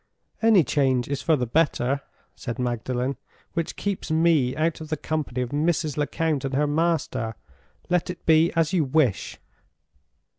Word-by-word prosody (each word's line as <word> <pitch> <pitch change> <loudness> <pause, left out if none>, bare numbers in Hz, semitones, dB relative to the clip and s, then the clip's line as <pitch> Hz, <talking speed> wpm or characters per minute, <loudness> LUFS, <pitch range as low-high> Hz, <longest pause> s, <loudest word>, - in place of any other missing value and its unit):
"Any 220 -6 +6
change 130 -4 +1
is 140 -1 -3
for 160 - +3
the 125 -4 -1
better," 140 0 +1 0.3
said 120 -3 -5
Magdalen 125 +2 -2 0.4
"which 165 -2 -2
keeps 200 -3 -3
me 160 -5 +3
out 160 +2 0
of 155 - -8
the 155 - -1
company 145 -5 -3
of 120 - -5
Mrs. 155 0 0
Lecount 150 0 -1
and 135 -1 -2
her 150 +2 +2
master! 150 -7 0 0.5
Let 180 -1 0
it 180 - -7
be 160 +1 +5
as 165 +1 +1
you 175 -4 +3
wish." 135 -5 +1
150 Hz, 155 wpm, -25 LUFS, 130-165 Hz, 0.5 s, Any